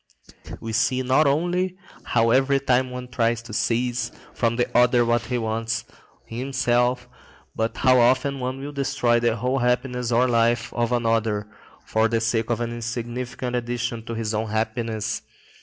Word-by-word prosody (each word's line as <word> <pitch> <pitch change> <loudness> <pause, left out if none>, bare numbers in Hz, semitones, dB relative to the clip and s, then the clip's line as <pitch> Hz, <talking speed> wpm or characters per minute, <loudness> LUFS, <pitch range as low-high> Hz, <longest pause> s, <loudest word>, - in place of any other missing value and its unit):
We 115 0 -5
see 130 +3 +1
not 130 +4 +3
only 175 +5 0 0.3
how 115 -1 +2
every 135 +2 +4
one 125 0 +1
tries 115 -2 0
to 115 - -10
seize 120 +3 0 0.2
from 115 -1 0
the 120 0 +2
other 120 0 +5
what 120 0 +2
he 125 0 -1
wants 115 0 -2 0.4
himself, 125 0 0 0.5
but 110 0 -1
how 130 -1 +5
often 130 +3 +3
one 130 +1 -3
will 140 +2 -6
destroy 135 -4 +1
the 120 -1 +1
whole 125 +4 0
happiness 125 0 0
or 120 +2 +4
life 115 0 +1
of 120 0 0
another 115 -3 +1 0.4
for 110 0 +2
the 115 0 0
sake 115 0 0
of 120 0 0
an 120 0 -2
insignificant 120 +1 -4
addition 120 -1 -2
to 115 - -5
his 110 -1 -2
own 110 +1 -1
happiness. 110 0 -2
120 Hz, 155 wpm, -24 LUFS, 115-125 Hz, 0.5 s, other